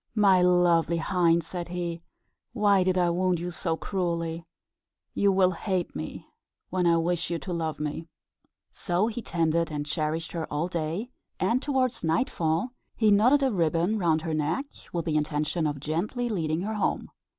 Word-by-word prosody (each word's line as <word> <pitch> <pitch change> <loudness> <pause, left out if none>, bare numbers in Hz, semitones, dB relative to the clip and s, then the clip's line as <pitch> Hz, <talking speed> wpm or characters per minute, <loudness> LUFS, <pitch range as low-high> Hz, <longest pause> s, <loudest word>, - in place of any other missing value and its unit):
"My 195 -4 +5
lovely 175 -2 +3
hind," 170 -1 +2
said 175 +1 -5
he, 170 -1 -4 0.5
"why 205 -4 +4
did 185 0 +1
I 175 -1 +3
wound 180 0 +1
you 175 +1 -4
so 165 -1 -2
cruelly? 170 -3 -2 0.7
You 200 -1 +3
will 190 -1 +4
hate 185 0 -2
me, 80 0 -6 0.5
when 180 -1 +1
I 170 0 +4
wish 170 +1 0
you 170 - -1
to 180 +2 -5
love 160 -3 -2
me." 150 +2 -4 0.6
So 180 +1 0
he 235 +1 -3
tended 165 -4 0
and 145 -1 -3
cherished 155 +2 -2
her 165 -2 -4
all 150 +3 0
day, 175 +7 -3 0.3
and, 230 +8 +1
towards 260 -4 0
nightfall, 165 - 0 0.2
he 215 -2 +3
knotted 250 +8 +5
a 265 - +2
ribbon 175 +3 +1
round 160 -3 +2
her 165 -2 -2
neck, 155 - 0 0.3
with 170 -2 -2
the 155 -2 +1
intention 150 +2 0
of 145 -1 -3
gently 180 - -2
leading 165 -5 -1
her 215 +3 -3
home. 210 - -1
175 Hz, 170 wpm, -27 LUFS, 160-195 Hz, 0.7 s, My